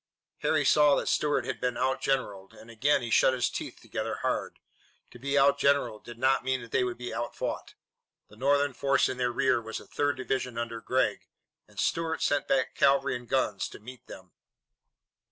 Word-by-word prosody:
Harry - - +1
saw 150 -2 +5
that - - -1
Stuart 145 -1 +1
had - - -4
been 125 -1 -1
outgeneralled, 130 -7 -1
and 115 - -13
again 135 +4 +2
he 120 - -5
shut 130 - +4
his 125 -1 0
teeth - - -6
together - - -4
hard. - - -2 0.5
To 120 - -13
be 140 +3 -1
outgeneralled 140 -4 +3
did 120 -1 -10
not 130 +2 +2
mean 130 0 0
that 115 - -12
they - - +2
would 125 -1 -3
be 125 0 -6
outfought. 120 - -4 0.5
The 105 - -17
Northern 140 +3 +2
force 135 +2 +2
in 125 - -4
their 125 -1 0
rear 130 -1 +2
was 110 0 -6
the - - -10
third 145 -1 -1
division 130 -2 -3
under 115 -1 -4
Gregg, 130 +3 0 0.4
and - - -12
Stuart 165 -1 0
sent 145 0 +1
back 130 -1 +1
cavalry 140 -3 +3
and 125 -2 -8
guns - - 0
to - - -11
meet 125 +2 -12
them. 90 -1 -12
130 Hz, 190 wpm, -28 LUFS, 120-140 Hz, 0.5 s, saw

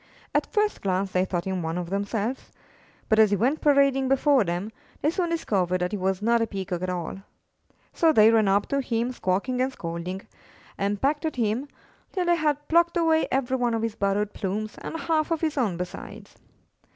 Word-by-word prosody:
At - - 0
first 420 -1 0
glance 190 0 -1
they 185 0 +2
thought 175 -2 -3
him 190 -1 -2
one 165 +1 -3
of 175 0 -4
themselves, 205 +5 -2 0.6
but, 220 - +3
as 215 -1 +7
he 205 - +2
went 255 - +1
parading 275 -2 +3
before 270 -1 +4
them, 180 +4 -3 0.3
they 300 - +1
soon 345 0 -1
discovered 190 - 0
that 180 - -1
he 210 - -2
was 190 +1 -1
not 235 +1 +3
a 230 - +1
Peacock 185 -4 -4
at 185 - -2
all. 180 0 -4 0.8
So 325 -1 +4
they 220 -5 +6
ran 220 -2 +3
up 200 +1 +3
to 275 0 +1
him 240 -1 -1
squawking 245 +4 -1
and 260 +1 +1
scolding, 180 -2 -5 0.5
and 200 +1 -1
pecked 290 +5 0
at 315 - -2
him, 235 +3 -1 0.5
till 365 -3 0
they 345 0 +4
had 295 -2 0
plucked 340 +1 +3
away 325 -1 +3
every 260 -1 0
one 240 -2 +1
of 225 - -2
his 230 -2 -1
borrowed 200 0 -1
plumes 210 +3 -3
and 325 - -5
half 315 -1 +1
of 330 -2 -1
his 315 -2 0
own 220 - 0
besides. 180 0 -8
225 Hz, 200 wpm, -25 LUFS, 190-285 Hz, 0.8 s, as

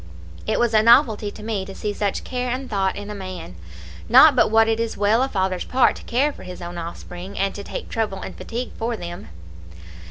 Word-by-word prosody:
It - - +1
was 240 -2 +2
a 215 - +6
novelty 230 -2 +5
to 210 - -11
me 215 -3 -2
to 195 0 -9
see 210 -1 -3
such 200 -1 -2
care 250 0 -3
and 260 +2 -3
thought 195 -3 0
in 205 +1 -6
a - - -4
man, 185 - -7 0.6
not 265 +4 +8
but - - +4
what 225 +1 +5
it 225 0 +1
is 230 -1 -2
well 210 +4 +3
a 265 - +1
father's 190 -4 -1
part 255 0 +3
to - - -12
care 280 +5 +1
for - - -13
his 180 0 -9
own 175 0 -6
offspring, 175 +3 -8
and 195 0 0
to 200 - -7
take - - -6
trouble 215 -4 -2
and - - -7
fatigue 240 +2 -5
for 230 0 -2
them. 175 -1 -7
210 Hz, 225 wpm, -22 LUFS, 190-235 Hz, 0.6 s, not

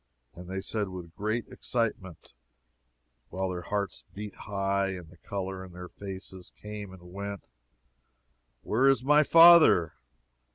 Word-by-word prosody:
And 90 +1 -11
they 95 0 -3
said, 105 0 -3
with 90 -3 -9
great 110 +3 -2
excitement, 105 - -4 1.0
while 95 0 -2
their 90 -1 -4
hearts 100 0 -3
beat 105 0 -6
high, 100 -1 -1
and 90 -3 -9
the 90 - -17
color 95 0 -5
in 90 -2 -12
their 90 0 -9
faces 95 -2 -9
came 105 -2 -7
and 90 -1 -14
went, 100 0 -6 1.2
Where 130 +5 +2
is 135 -2 +3
my 150 +3 +5
father? 165 - +7
100 Hz, 135 wpm, -28 LUFS, 90-105 Hz, 1.2 s, father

